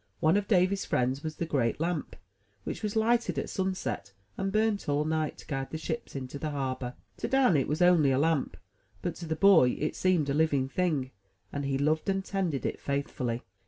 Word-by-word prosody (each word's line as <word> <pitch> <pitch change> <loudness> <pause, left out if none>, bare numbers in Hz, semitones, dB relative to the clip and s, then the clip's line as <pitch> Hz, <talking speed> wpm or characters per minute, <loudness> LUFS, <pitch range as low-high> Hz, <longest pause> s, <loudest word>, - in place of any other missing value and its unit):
One 160 +2 +4
of 205 0 +1
Davy's 190 -1 +3
friends 130 +2 0
was 155 -1 -5
the 170 - -2
great 130 -7 0
lamp, 165 -1 -2 0.5
which - - -5
was 210 -1 -2
lighted 225 -6 +2
at 135 - -2
sunset, 155 - -3 0.2
and 195 0 -2
burnt 215 -4 +1
all 145 +1 +1
night, 155 -1 -1
to - - -12
guide 135 -2 -3
the 160 - -4
ships 160 +7 -5
into 135 +1 -5
the 155 - -2
harbor. 130 -3 -3 0.2
To - - -2
Dan 265 -9 +4
it 140 - +2
was 155 +5 +1
only 175 -5 +5
a 130 - +2
lamp; 155 -1 +1 0.5
but - - -1
to 170 - -7
the 160 - -1
boy 160 -8 +5
it 150 - -1
seemed 180 -6 +2
a 140 - 0
living 145 -3 +2
thing, 145 -4 -1 0.4
and 145 0 -2
he 135 -1 0
loved 155 +6 +1
and 195 0 0
tended 180 -9 -1
it - - -2
faithfully. 130 -4 -2
155 Hz, 205 wpm, -29 LUFS, 135-185 Hz, 0.5 s, only